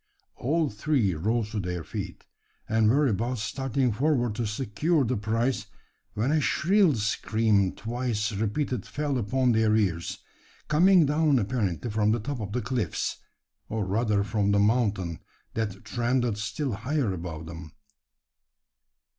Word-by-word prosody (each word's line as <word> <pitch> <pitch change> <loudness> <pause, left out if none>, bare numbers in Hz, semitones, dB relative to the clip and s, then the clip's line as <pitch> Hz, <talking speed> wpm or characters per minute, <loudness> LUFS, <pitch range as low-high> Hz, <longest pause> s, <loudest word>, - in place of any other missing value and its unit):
All 155 +5 +1
three 110 -3 +1
rose 105 +6 -1
to 110 - -2
their 90 -3 -3
feet, - - -6 0.4
and 110 -1 +3
were 145 +5 +4
about 120 +2 0
starting 125 +3 -1
forward 125 -1 +1
to 115 +1 -2
secure 135 +8 0
the 125 +2 0
prize; 115 +4 -1 0.5
when 115 +7 +1
a 155 0 +3
shrill 185 0 +3
scream 105 -2 +1
twice 115 -2 -2
repeated 110 +3 -1
fell 145 -3 -1
upon 125 +4 +1
their 110 -1 +3
ears 90 -6 0 0.5
coming 175 +2 +5
down 150 0 +3
apparently 105 -2 -1
from 105 0 +2
the 120 - 0
top 135 +4 -4
of 100 -2 -5
the 125 +3 -2
cliffs, 125 -4 -2 0.5
or 110 -2 -1
rather 105 +1 +1
from 100 0 0
the 100 - +3
mountain 105 -6 +1 0.3
that 105 -4 -3
trended 120 -1 0
still 130 +6 -2
higher 120 +1 -1
above 85 -3 -6
them. 80 -1 -9
115 Hz, 140 wpm, -27 LUFS, 105-130 Hz, 0.5 s, coming